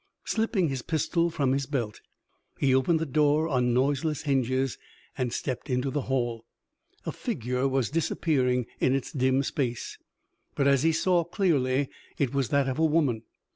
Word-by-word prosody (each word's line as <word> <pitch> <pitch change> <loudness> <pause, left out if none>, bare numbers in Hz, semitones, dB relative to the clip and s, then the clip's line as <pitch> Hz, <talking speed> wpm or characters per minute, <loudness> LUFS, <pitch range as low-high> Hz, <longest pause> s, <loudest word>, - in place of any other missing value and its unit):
Slipping 220 -5 +1
his 135 -2 -3
pistol 165 +4 0
from 140 -5 0
his 135 0 0
belt, 120 -7 -3 0.6
he 135 -2 +2
opened 130 +6 +3
the 160 - -1
door 150 +2 +2
on 125 -5 +1
noiseless 140 +4 +1
hinges 130 -2 0 0.4
and 125 -2 -1
stepped 130 +3 -4
into 125 +1 0
the 145 - -1
hall. 120 -3 -1 0.6
A - - -2
figure 125 +3 -2
was 135 -3 0
disappearing 130 -6 +1
in 130 - +3
its 135 - -3
dim 130 0 +2
space, 125 -4 -3 0.6
but, 140 - +2
as 140 -2 +4
he 165 +2 +3
saw 175 +2 +2
clearly, 145 -7 +1 0.3
it 140 -3 0
was 135 -4 0
that 140 -1 +2
of 130 +2 -2
a - - +3
woman. 150 -8 +2
135 Hz, 165 wpm, -27 LUFS, 130-155 Hz, 0.6 s, as